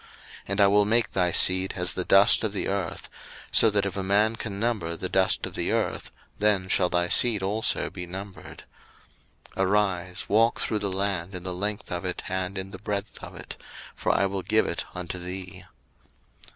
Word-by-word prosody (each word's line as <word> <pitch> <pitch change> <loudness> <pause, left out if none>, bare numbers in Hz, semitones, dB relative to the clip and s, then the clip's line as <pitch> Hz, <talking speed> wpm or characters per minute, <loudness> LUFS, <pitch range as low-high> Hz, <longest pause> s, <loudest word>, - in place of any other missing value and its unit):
01:013:016 - - -21 0.4
And 100 +1 0
I 100 - +7
will 100 +1 +4
make 115 +2 +2
thy 90 -2 +1
seed 95 +2 +3
as 90 -1 -1
the 90 - -2
dust 100 +6 +5
of 110 -2 -1
the 100 - -2
earth: 95 -4 -3 0.4
so 115 - +5
that 100 -1 +1
if 100 - -3
a 100 - -2
man 105 +4 +2
can 105 -3 -6
number 105 -8 -1
the 90 +2 -4
dust 95 0 +2
of - - -8
the - - -1
earth, - - -1 0.3
then 100 -3 +2
shall 90 -1 +2
thy 85 0 +1
seed 110 0 +4
also 110 +5 0
be 90 -2 -7
numbered. 95 +2 -9 0.9
01:013:017 95 - +1
Arise, 95 -3 0
walk 115 +3 +3
through 110 - -1
the 100 -1 -2
land 95 -1 -2
in 90 - -6
the 90 -1 -3
length 100 +3 -4
of 90 0 -3
it 90 -1 -3
and 95 +1 -2
in 95 0 -5
the 95 - -8
breadth 105 0 -5
of - - -9
it; - - -9 0.3
for - - 0
I 100 - +2
will 95 0 -2
give 110 +4 +2
it 85 - -3
unto 90 0 -5
thee. 90 +1 -7
95 Hz, 205 wpm, -26 LUFS, 90-105 Hz, 0.9 s, I